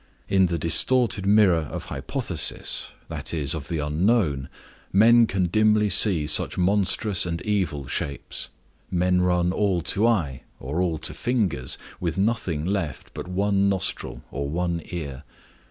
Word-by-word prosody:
In 95 -1 +3
the 85 -1 -2
distorted 100 - +2
mirror 95 -8 +3
of - - -6
hypothesis, - - 0 0.2
that - - -5
is, 70 -4 0
of 75 -3 -6
the 85 - -3
unknown, 75 - 0 0.4
men 115 +3 +5
can 95 -2 -1
dimly 105 +3 +2
see 95 -5 +5
such 75 - +1
monstrous 100 +1 +2
and 85 -1 -3
evil 95 -10 -2
shapes; 70 +1 -4 0.4
men 90 0 +1
run 90 -1 +1
all 95 -2 0
to 110 +4 +2
eye, 80 - 0 0.2
or 75 +7 -3
all 85 -3 -1
to - - -4
fingers, 95 - -2 0.2
with 85 -1 -3
nothing 95 -7 -1
left 85 -7 -4
but - - -7
one 100 +1 +1
nostril 95 -2 -3
or 70 +1 -4
one 85 +1 -2
ear. 70 -6 -6
90 Hz, 145 wpm, -24 LUFS, 80-100 Hz, 0.4 s, men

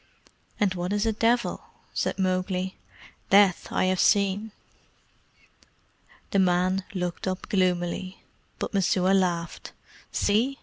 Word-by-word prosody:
"And 200 -3 +2
what 180 +1 -3
is 205 +1 0
a 225 - +2
devil?" 235 +3 +1 0.3
said - - -1
Mowgli. 185 0 -1 0.5
"Death 195 -2 +5
I - - +1
have 185 0 +1
seen." 205 +1 +2 1.8
The 195 - +2
man 185 +1 +2
looked 180 0 -3
up 185 0 -3
gloomily, 185 0 0 0.4
but - - -4
Messua 190 -1 +2
laughed. 175 -3 -1 0.4
"See!" 235 +7 +1
190 Hz, 115 wpm, -26 LUFS, 180-205 Hz, 1.8 s, Death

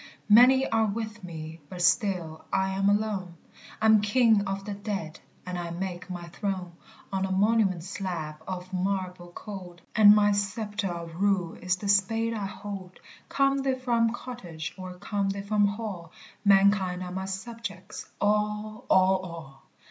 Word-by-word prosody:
"Many 255 +5 +7
are 225 -1 +2
with 220 0 -4
me, 160 -2 -7
but 180 - -8
still 180 -5 +1
I'm 190 +1 +1
alone, 205 -4 0 0.4
I'm 220 -1 +5
king 220 -1 +4
of 195 0 -3
the 205 - -4
dead 200 -6 -5 0.3
and 180 -1 -4
I 170 -1 -4
make 180 +1 -5
my 175 -1 -5
throne 185 -1 -3 0.4
On 190 0 0
a 190 - -1
monument 195 -3 +2
slab 175 -5 -4
of 185 0 -6
marble 185 -2 -2
cold; 185 -4 -8
And 210 -2 +9
my 205 -1 +4
sceptre 205 0 -1
of 170 0 -6
rule 195 -4 +2
is 180 0 -1
the 200 +2 -6
spade 225 +3 +2
I 205 -3 -3
hold: 195 -2 -8 0.3
Come 275 0 +2
they 270 -1 +1
from 235 -3 +2
cottage 180 -10 -7
or 185 -1 -8
come 200 +1 -2
they 195 0 -3
from 205 0 +3
hall, 200 -5 -5 0.3
Mankind 195 -2 +4
are 180 - -6
my 190 +1 -3
subjects, 195 0 -7
all, 210 +2 0
all, 190 0 +5
all! 165 -7 -10
195 Hz, 155 wpm, -27 LUFS, 180-210 Hz, 0.4 s, And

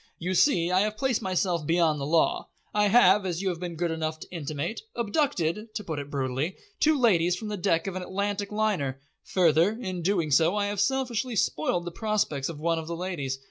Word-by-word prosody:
"You 180 +3 -2
see, 180 - +3
I 185 - +4
have 215 +1 0
placed 260 -3 0
myself 185 -3 0
beyond 165 -1 +2
the 140 - -3
law. 165 +1 +1 0.2
I 210 0 +3
have, 200 -2 +5
as 180 0 -3
you 190 - +1
have 175 -2 -4
been 175 -1 -5
good 170 +1 -1
enough 160 -1 -3
to - - -8
intimate, 160 +3 -4
abducted 215 - -1
to 210 - -3
put 160 -5 -4
it 140 0 -7
brutally 135 +4 -2 0.2
two 310 0 +4
ladies 180 -7 +3
from 215 +3 -6
the 210 - -2
deck 165 -2 +1
of 195 -2 -4
an 185 - -3
Atlantic 200 +2 -3
liner. 195 -12 -1 0.3
Further, 175 +3 +3
in 185 -7 -4
doing 170 -4 0
so 165 +7 +4
I 205 -1 +1
have 205 -1 -3
selfishly 250 0 0
spoiled 175 -2 0
the 175 - -4
prospects 195 -10 -1
of 160 -3 -7
one 165 +1 0
of 160 - -7
the 170 - -3
ladies. 160 -8 -3
180 Hz, 215 wpm, -27 LUFS, 160-210 Hz, 0.3 s, have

